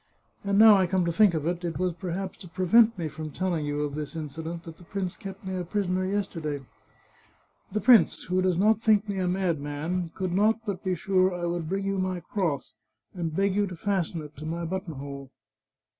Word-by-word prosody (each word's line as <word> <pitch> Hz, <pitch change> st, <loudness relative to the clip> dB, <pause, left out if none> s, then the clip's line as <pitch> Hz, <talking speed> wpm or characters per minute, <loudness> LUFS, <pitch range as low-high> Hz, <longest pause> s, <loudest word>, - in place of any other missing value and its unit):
And 200 Hz, 0 st, +1 dB
now 215 Hz, -1 st, +9 dB
I 190 Hz, -1 st, +3 dB
come 185 Hz, -1 st, +1 dB
to 170 Hz, -, +1 dB
think 200 Hz, 0 st, +4 dB
oi 155 Hz, 0 st, -1 dB
it, 175 Hz, 0 st, -6 dB
it 170 Hz, -1 st, -3 dB
was 180 Hz, -1 st, 0 dB
perhaps 185 Hz, +2 st, -4 dB
to 185 Hz, -, -10 dB
prevent 210 Hz, +6 st, +4 dB
me 165 Hz, -3 st, -2 dB
from 155 Hz, +1 st, -6 dB
tell 185 Hz, +4 st, -2 dB
ing 155 Hz, -3 st, -1 dB
you 145 Hz, 0 st, -1 dB
of 145 Hz, -1 st, -2 dB
this 150 Hz, +2 st, -5 dB
incident 160 Hz, +2 st, -5 dB
that 165 Hz, -1 st, -10 dB
the -, -, -15 dB
prince 185 Hz, 0 st, -4 dB
kept 195 Hz, 0 st, -9 dB
me 190 Hz, 0 st, -3 dB
a 180 Hz, -, -2 dB
prisoner 185 Hz, 0 st, -1 dB
yesterday. 165 Hz, -8 st, -2 dB, 1.1 s
The 215 Hz, +2 st, -1 dB
prince, 235 Hz, -8 st, +5 dB
who 185 Hz, +1 st, 0 dB
does 185 Hz, -2 st, +2 dB
not 215 Hz, +3 st, +3 dB
think 215 Hz, -1 st, +3 dB
me 200 Hz, -2 st, -2 dB
a 185 Hz, -, 0 dB
madman, 170 Hz, -1 st, -1 dB
could 185 Hz, -2 st, -2 dB
not 215 Hz, +4 st, +3 dB
but 200 Hz, -4 st, -4 dB
be 185 Hz, -1 st, 0 dB
sure 185 Hz, +1 st, +2 dB
I 175 Hz, -1 st, -3 dB
would 170 Hz, -2 st, -2 dB
bring 195 Hz, +1 st, -1 dB
you 195 Hz, -1 st, 0 dB
my 185 Hz, -1 st, -1 dB
cross, 170 Hz, -6 st, -2 dB, 0.4 s
and 165 Hz, -4 st, -3 dB
beg 195 Hz, +1 st, +2 dB
you 205 Hz, +1 st, +1 dB
to 180 Hz, -, -7 dB
fasten 175 Hz, -3 st, -1 dB
it 150 Hz, 0 st, -12 dB
to 155 Hz, -, -7 dB
my 170 Hz, +1 st, -3 dB
buttonhole." 140 Hz, -6 st, -5 dB
180 Hz, 220 wpm, -27 LUFS, 165-195 Hz, 1.1 s, now